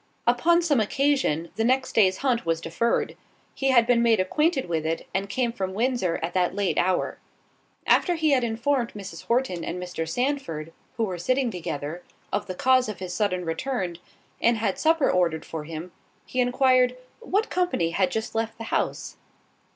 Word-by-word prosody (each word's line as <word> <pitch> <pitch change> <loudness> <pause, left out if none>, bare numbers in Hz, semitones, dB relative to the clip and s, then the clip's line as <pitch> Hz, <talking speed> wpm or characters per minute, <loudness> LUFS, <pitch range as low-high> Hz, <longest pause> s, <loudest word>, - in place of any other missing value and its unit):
Upon 335 +9 +3
some 295 -7 +3
occasion 220 - +1
the 225 - +1
next 260 +3 +1
day's 190 -4 +4
hunt 245 -3 +2
was 165 -1 0
deferred: 165 +8 -1 0.4
he 270 - 0
had 240 -3 +5
been 240 -1 +3
made 230 -3 +4
acquainted 285 - +1
with 165 -2 -1
it, 160 +1 -2
and 195 +1 -1
came 245 +1 0
from 190 -4 -3
Windsor 230 -7 0
at 170 +1 -2
that 180 0 +1
late 200 -2 0
hour. 185 0 0 0.7
After 355 - +3
he 315 -2 +2
had 260 -3 +3
informed 235 +2 0
Mrs. 185 -5 -8
Horton 235 -8 0
and 180 - -4
Mr. 180 -3 -4
Sandford, 245 - -2 0.2
who 230 - +1
were 185 -5 -3
sitting 255 +6 +1
together, 160 -2 -5 0.3
of 205 - -1
the 185 - -5
cause 255 +2 +3
of 210 - -5
his 185 -1 -6
sudden 185 -3 0
return, 175 0 -3 0.4
and 235 0 +3
had 215 -3 -1
supper 320 -2 +3
ordered 170 -3 +1
for 155 -2 -6
him, 165 +3 -7 0.3
he 255 - -4
enquired, 250 0 +3 0.2
"What 445 -1 -1
company 355 - 0
had 185 +2 +1
just 220 +2 -3
left 225 0 -2
the 225 - -6
house?" - - -2
225 Hz, 180 wpm, -25 LUFS, 180-255 Hz, 0.7 s, had